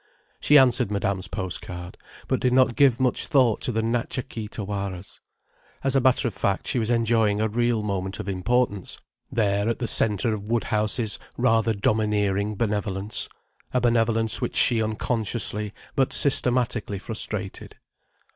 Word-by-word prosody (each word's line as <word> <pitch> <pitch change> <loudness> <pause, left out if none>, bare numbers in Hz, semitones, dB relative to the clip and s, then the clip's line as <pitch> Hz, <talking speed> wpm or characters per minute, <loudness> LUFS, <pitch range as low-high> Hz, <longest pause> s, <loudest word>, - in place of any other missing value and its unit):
She 150 - +5
answered 125 -6 +4
Madame's 100 -2 -2
post 95 -3 -5
card, 90 -1 -8 0.3
but - - 0
did 125 - +1
not 130 -2 +3
give 135 -4 +4
much 130 -2 +1
thought 125 -6 +3
to - - -1
the 110 -1 -1
Natcha 120 +3 -2
Kee 110 -4 -6
Tawaras. 100 -3 -6 0.6
As 135 0 +2
a 135 - +4
matter 130 0 +3
of 115 - -4
fact, 100 0 -1
she 125 - 0
was 110 -1 -1
enjoying 115 -3 +2
a 110 - +1
real 120 0 0
moment 95 -1 -3
of - - -6
importance, 100 +1 -1 0.3
there 100 -1 +1
at 115 - -1
the 125 - -3
centre 110 0 +3
of 105 - -4
Woodhouse's 110 -1 0 0.2
rather 115 -2 +2
domineering 105 -1 0
benevolence: 105 -1 -1 0.5
a - - +4
benevolence 115 -2 +1
which - - -3
she 115 -2 +4
unconsciously, 110 -1 -1 0.2
but 135 -1 +1
systematically 125 -6 +1
frustrated. 110 -1 -3
110 Hz, 150 wpm, -24 LUFS, 100-120 Hz, 0.6 s, She